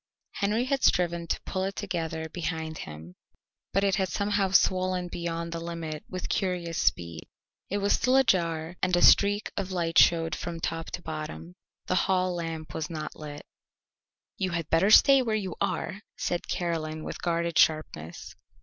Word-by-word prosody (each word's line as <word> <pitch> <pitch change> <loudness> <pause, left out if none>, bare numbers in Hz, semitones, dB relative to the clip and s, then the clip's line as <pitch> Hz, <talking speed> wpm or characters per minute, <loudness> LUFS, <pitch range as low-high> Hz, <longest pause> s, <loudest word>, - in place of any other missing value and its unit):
Henry 215 +5 0
had 270 0 -1
striven 170 -1 +2
to - - -1
pull 185 - -3
it 195 +1 -3
together 165 -5 -3
behind 160 -1 -4
him, 80 +3 -9 0.6
but 195 - +1
it 195 -2 +2
had 190 -2 0
somehow 200 +3 0
swollen 185 -1 +2
beyond 170 -1 -4
the 165 - -3
limit 165 -2 -5
with 185 -1 -5
curious 180 -4 -1
speed. 85 -2 -1 0.4
It 200 - -1
was 200 0 +2
still 255 +1 +2
ajar 170 -8 +1
and 185 -1 +2
a 175 - +2
streak 205 +1 +5
of 195 -1 -3
light 170 -2 +2
showed 165 -2 +4
from 170 -1 -5
top 165 0 -3
to 175 - -5
bottom. 80 +2 -6 0.3
The - - -1 0.2
hall 185 -1 +2
lamp 165 -2 -5
was 155 - -3
not 155 -2 -5
lit. 150 -1 -9 0.9
"You 190 -1 -1
had 170 -3 -3
better 165 +5 +4
stay 275 +5 +7
where 225 -4 0
you 190 -5 -3
are," 195 - -2 0.2
said 175 - -2
Caroline 160 -3 -2
with - - -6
guarded 170 -1 -1
sharpness. 90 - 0
170 Hz, 165 wpm, -28 LUFS, 160-190 Hz, 0.9 s, stay